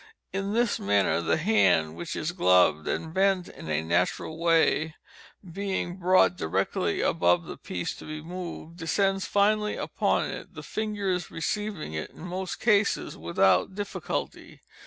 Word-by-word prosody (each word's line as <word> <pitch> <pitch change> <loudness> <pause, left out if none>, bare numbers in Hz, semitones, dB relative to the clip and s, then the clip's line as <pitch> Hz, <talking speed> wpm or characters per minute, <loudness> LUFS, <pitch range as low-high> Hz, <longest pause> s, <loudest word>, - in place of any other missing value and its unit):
In 195 +1 -2
this 235 0 +1
manner, 100 -3 +2
the 85 - +1
hand 155 - +3
(which 85 0 -5
is 155 - -2
gloved 90 - +3
and 160 0 -3
bent 190 -1 +2
in 80 - -10
a 75 0 0
natural 90 - 0
way,) 160 -2 +2 0.6
being 190 -2 -2
brought 185 0 +4
directly 80 - -1
above 90 0 +2
the - - -7
piece 90 -1 -4
to - - -10
be 155 0 -6
moved, 170 0 -7
descends 195 +4 0
finally 210 +1 +2
upon - - 0
it, - - -9
the - - -8
fingers 200 -5 -2
receiving 200 - -3
it, 80 - -4
in - - -15
most 185 +1 -4
cases, 210 -3 +2
without 95 - +2
difficulty. 205 0 -5
175 Hz, 145 wpm, -27 LUFS, -, 0.6 s, brought